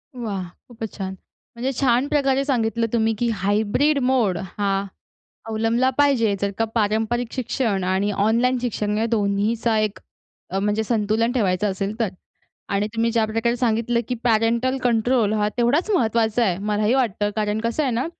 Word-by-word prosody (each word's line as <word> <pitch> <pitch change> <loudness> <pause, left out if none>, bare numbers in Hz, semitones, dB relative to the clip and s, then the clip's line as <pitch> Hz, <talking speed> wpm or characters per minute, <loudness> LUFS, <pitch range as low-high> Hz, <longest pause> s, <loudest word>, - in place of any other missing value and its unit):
वाह! 210 -6 -4 0.2
खूपच 225 -3 -7
छान. 190 -2 -4 0.4
म्हणजे 250 +3 -2
छान 255 0 +2
प्रकारे 275 -2 +1
सांगितलं 230 -4 0
तुम्ही, 225 -1 +2
की 240 - +1
हायब्रिड 215 +8 +1
मोड 250 -8 +2 0.2
हा 200 -1 +1 0.8
अवलंबला 225 +3 +1
पाहिजे 255 -8 +3
जर 200 0 0
का 225 - +1
पारंपरिक 225 +2 0
शिक्षण 235 -5 -1
आणि 190 +3 0
ऑनलाईन 230 +6 +2
शिक्षण 210 -3 -1
या 220 - +1
दोन्हीचा 220 +2 +1
एक 210 -3 -1 0.5
अ, 190 - -1
म्हणजे 210 +2 0
संतुलन 220 +1 +1
ठेवायचं 205 -4 +1
असेल 195 +4 -4
तर. 225 -4 +1 0.6
आणि 200 +1 0
तुम्ही 230 +1 +1
ज्या 230 -1 +2
प्रकारे 225 +2 0
सांगितलं 235 0 +1
की 250 - -1
पॅरेंटल 235 +3 +2
कंट्रोल 235 -2 +2
हा 210 -1 +1
तेवढाच 270 - +2
महत्त्वाचा 230 - +2
आहे. 185 -6 +1
मलाही 210 +3 0
वाटतं 220 -6 +1
कारण 210 0 0
कसं 235 +6 0
आहे 265 - 0
ना, 240 +3 -1
225 Hz, 160 wpm, -22 LUFS, 210-240 Hz, 0.8 s, पाहिजे